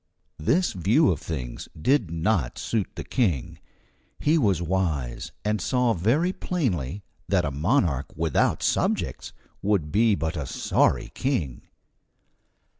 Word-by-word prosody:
This 170 - +2
view 110 - +3
of 80 - -2
things 65 -7 -5
did 120 - +2
not 85 - 0
suit 110 -4 -1
the - - -5
King. 90 - -1 0.6
He 155 +2 +3
was 100 - +3
wise, 80 -10 -2
and 105 -2 0
saw 125 +3 +2
very 135 - +1
plainly 100 - -2 0.3
that - - +2
a 75 - -1
monarch 75 - +1
without 80 -1 +1
subjects - - 0 0.3
would 95 -7 0
be 110 0 +4
but 80 +1 -2
a 75 -5 -3
sorry 60 - +1
king. 85 - -2
90 Hz, 125 wpm, -25 LUFS, 75-115 Hz, 0.6 s, be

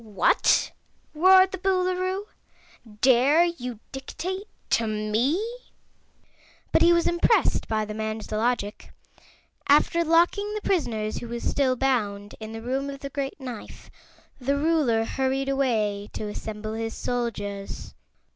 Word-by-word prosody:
"What!" 210 -3 +2 0.4
roared 375 +4 +6
the 380 - -5
Boolooroo, 370 0 0 0.8
"dare 265 +6 +5
you 250 -10 -4
dictate 370 +9 -5 0.2
to 230 - +2
me?" 215 - 0 1.3
But - - +3
he 345 - +6
was 340 -1 +3
impressed 345 +6 +2
by 215 -1 0
the 210 - -6
man's 220 0 -4
logic. 215 -1 -2 0.8
After 300 +4 +4
locking 350 +6 +2
the 425 - -3
prisoners, 225 - 0
who 235 - -7
were 235 +1 -4
still 260 +1 +1
bound, 210 -6 -1
in 220 0 -7
the 225 0 -7
Room 270 +3 -2
of 275 0 -8
the 275 - -6
Great 275 +1 -4
Knife, 250 -5 -9 0.5
the 280 +2 0
Ruler 285 -8 +2
hurried 270 +2 -1
away 215 -7 0
to 215 - -4
assemble 215 +1 -5
his 225 0 -4
soldiers. 205 -5 -4
255 Hz, 130 wpm, -25 LUFS, 220-330 Hz, 1.3 s, roared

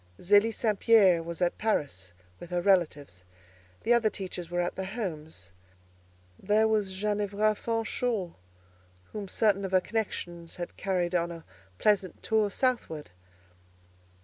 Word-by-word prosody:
Zélie 205 +4 +4
St. 215 -2 -1
Pierre 195 -7 +5
was 170 +2 -3
at 175 - 0
Paris, 135 - -1 0.3
with 175 - -10
her 180 -1 0
relatives; 160 - +1 0.6
the 240 - +4
other 235 -2 +3
teachers 180 -4 -6
were 175 0 -2
at 175 0 -1
their 190 - -3
homes. 160 - -6 0.9
There 210 +3 +3
was 210 -3 0
Ginevra 210 +1 +1
Fanshawe, 225 -3 -2 0.8
whom 210 -2 -5
certain 200 0 +2
of 190 -1 -4
her 185 - +6
connections 175 -5 -4
had 175 -1 -6
carried 180 -2 -1
on 170 -1 +1
a 165 -1 -9 0.3
pleasant 200 -3 +1
tour 220 -2 +2
southward. 200 - -1
190 Hz, 135 wpm, -29 LUFS, 175-215 Hz, 0.9 s, her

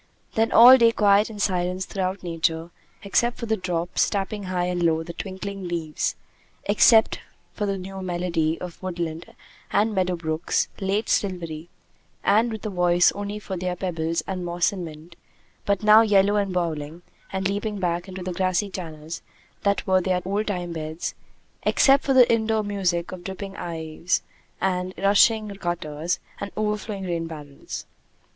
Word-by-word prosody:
Then 225 +1 +1
all 250 +3 +9
day 230 -1 +6
quiet 205 -1 +4
and 215 -2 -9
silence 185 -1 0
throughout 190 0 -3
Nature 165 -1 -1 0.3
except 235 +4 +1
for 235 - -4
the 220 -1 +1
drops, 175 -3 0
tapping 200 0 -3
high 180 -1 -1
and 180 0 -1
low 165 -1 +2
the 170 - -8
twinkling 195 0 -6
leaves; 165 -3 -2 0.5
except 220 +2 +5 0.3
for 210 - -2
the 195 0 -1
new 190 +1 -7
melody 175 -3 -1
of 180 -2 -8
woodland 170 -3 -5 0.3
and 215 +2 +2
meadow 185 -2 +1
brooks, 160 0 -1
late 200 +3 0
silvery 170 -4 -2 0.5
and 220 +4 +3
with 220 -2 -6
a 215 - -2
voice 175 -1 +4
only 205 +1 -5
for 195 -2 -6
their 180 0 -2
pebbles 165 -3 -2
and 185 -2 -4
moss 175 0 +1
and 185 -3 -5
mint, 160 +2 -11 0.5
but 200 0 +1
now 215 +1 +8
yellow 205 -2 +4
and 200 -2 +1
brawling 165 -2 -3 0.3
and 190 0 -1
leaping 205 +1 -2
back 175 -1 -1
into 190 -1 -7
the 180 0 -3
grassy 185 +2 0
channels 160 -3 -7 0.4
that 200 -1 +1
were 185 0 +3
their 180 0 0
old 205 +3 -1
time 180 -4 -3
beds; 155 0 -4 0.5
except 275 +1 +4
for 270 - +1
the 250 -2 +8
indoor 220 -1 +1
music 185 -4 -1
of 185 -1 -8
dripping 195 +1 -6
eaves 165 +1 -2 0.4
and 185 -1 -1
rushing 210 +2 +4
gutters 175 -4 -3 0.2
and 200 - -4
overflowing 210 -1 -2
rain 170 -2 -2
barrels. 145 -3 -8
185 Hz, 160 wpm, -24 LUFS, 170-205 Hz, 0.5 s, all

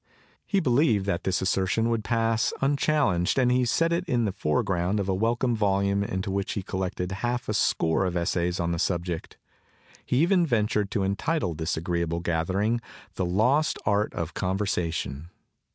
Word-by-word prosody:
He 200 - +2
believed 125 - +2
that 90 -3 -2
this 95 0 0
assertion 95 +4 +1
would 115 -2 0
pass 115 0 +1
unchallenged 140 - +1
and 125 -2 +3
he 125 0 +3
set 165 +7 +2
it 170 +2 0
in 120 -8 +1
the 100 - 0
foreground 95 +2 0
of 100 - -2
a 95 - +1
welcome 115 +4 +1
volume 100 -1 +1
into 95 -1 -3
which 100 0 -2
he 100 - -3
collected 90 -1 -3
half 120 +5 -2
a - - -1
score 80 +3 +1
of 90 -1 -2
essays 85 0 0
on 85 0 0
the 85 - -2
subject. 85 -2 -2 0.7
He 125 - -1
even 175 +4 +4
ventured 105 -7 +1
to 100 0 -1
entitle 100 - -1
this 80 +1 -2
agreeable 85 0 -1
gathering 95 +7 0 0.3
the 95 - -2
'Lost 125 - +2
Art 105 +1 +1
of 85 -1 -3
Conversation. 85 -6 -2
100 Hz, 170 wpm, -26 LUFS, 90-120 Hz, 0.7 s, even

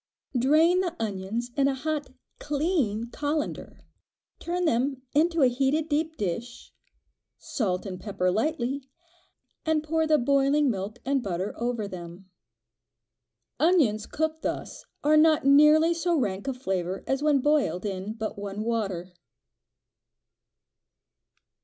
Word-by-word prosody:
Drain 310 +8 +4
the 355 -2 -1
onions 215 +3 -3
in 275 -1 +3
a 275 - 0
hot 300 +2 -3 0.3
clean 280 - -1
colander, 295 +2 -4 0.5
turn 355 +1 -2
them 260 -1 0
into 330 +1 +3
a - - +7
heated 270 +5 +1
deep 315 +2 -1
dish, 220 +5 -5 0.6
salt 190 -8 -2
and 185 -2 -6
pepper 185 -2 -1
lightly, 270 - -1 0.7
and 315 -1 +1
pour 320 +1 0
the 310 -1 +4
boiling 280 +1 +3
milk 200 +2 -5
and 275 0 +1
butter 190 -1 -3
over 235 -3 -2
them. 180 0 -9 1.3
Onions 295 - +3
cooked 315 +1 -2
thus - - -5 0.2
are 305 +1 +5
not 310 -2 +4
nearly 300 +4 +6
so 340 0 0
rank 200 -4 -2
of 265 -2 -2
flavor 190 -6 -2
as 270 +1 -1
when 300 -1 +3
boiled 265 - +1
in 195 +1 -4
but 220 -2 -5
one 200 +1 -4
water. 195 -6 -2
265 Hz, 125 wpm, -27 LUFS, 210-305 Hz, 1.3 s, a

